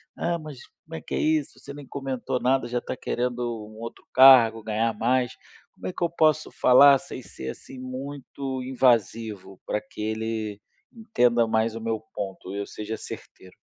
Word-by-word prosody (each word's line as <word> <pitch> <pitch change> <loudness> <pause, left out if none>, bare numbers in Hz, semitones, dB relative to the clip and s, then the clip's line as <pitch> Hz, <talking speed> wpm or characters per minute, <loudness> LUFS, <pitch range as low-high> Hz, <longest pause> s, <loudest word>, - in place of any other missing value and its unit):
"Ah, 170 0 -1
mas 155 -5 -9 0.3
como 160 - -13
é - - -6
que - - -5
é - - 0
isso? 155 -2 0
Você 140 - -10
nem 145 -2 -10
comentou 135 -2 -3
nada, 130 0 +1
já 120 0 -1
tá - - -5
querendo 125 0 -2 0.3
um 110 +1 -13
outro 115 0 -8
cargo, 125 -4 +8
ganhar 110 +1 0
mais". 125 +3 +1 0.4
Como - - -8
é 185 - -4
que - - -4
eu 170 - +2
posso 155 -2 +2
falar 140 +2 +7
sem - - -9
ser, 65 0 -8
assim, 130 - -10
muito 130 0 -6
invasivo, 115 -6 0
pra 105 - -1
que 110 0 -11
ele 110 -1 -3 0.4
entenda 120 - +2
mais 110 0 +1
o 115 - -6
meu 115 -1 -2
ponto 95 -1 -6
e 100 - -4
eu 100 - -3
seja 110 +1 -6
certeiro? 95 - -11
120 Hz, 185 wpm, -25 LUFS, 110-135 Hz, 0.4 s, cargo